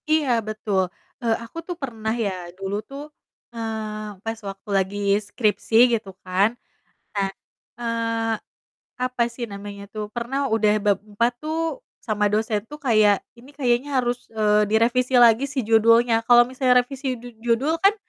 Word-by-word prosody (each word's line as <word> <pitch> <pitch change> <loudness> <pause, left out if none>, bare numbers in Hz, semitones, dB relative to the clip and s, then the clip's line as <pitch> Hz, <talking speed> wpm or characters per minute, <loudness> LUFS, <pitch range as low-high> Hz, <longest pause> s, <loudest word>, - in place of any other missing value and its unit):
Iya, 310 -3 +2 0.2
betul! 210 -3 0 0.4
Eee, 230 -2 +2
aku 230 - -12
tuh 355 - -3
pernah 225 -4 -3
ya, 185 -6 -3
dulu 195 +1 -3
tuh, 290 +2 -9 0.4
eee, 215 -2 -5
pas 225 0 -3
waktu 195 +2 -11
lagi 190 +1 -1 0.2
skripsi 215 +1 -1 0.2
gitu 220 -4 -1 0.2
kan. 185 +3 +3 0.7
Nah, 200 -1 +1 0.5
eee, 230 -1 -1 0.7
apa 255 -1 0
sih 235 +1 -5
namanya 200 -1 -8
tuh, 210 -1 -5
pernah 270 +3 -2
udah 220 -1 +3
bab 200 -2 +3
4 235 +4 +1
tuh, 315 +1 -2 0.4
sama 210 -2 0
dosen 210 0 0
tuh 295 +3 -11
kayak, 215 -6 +4 0.2
"Ini 255 +4 -15
kayaknya 250 -1 +1
harus, 245 0 -2
eee, 210 -1 +3
direvisi 245 +4 +2
lagi 240 +1 +6
sih 270 -1 -2
judulnya." 230 +1 +4
Kalau 240 0 +8
misalnya 250 0 +3
revisi 265 +1 -4
du 245 0 -10
judul 240 +8 +1
kan, 395 +4 +4
230 Hz, 150 wpm, -23 LUFS, 210-250 Hz, 0.7 s, Kalau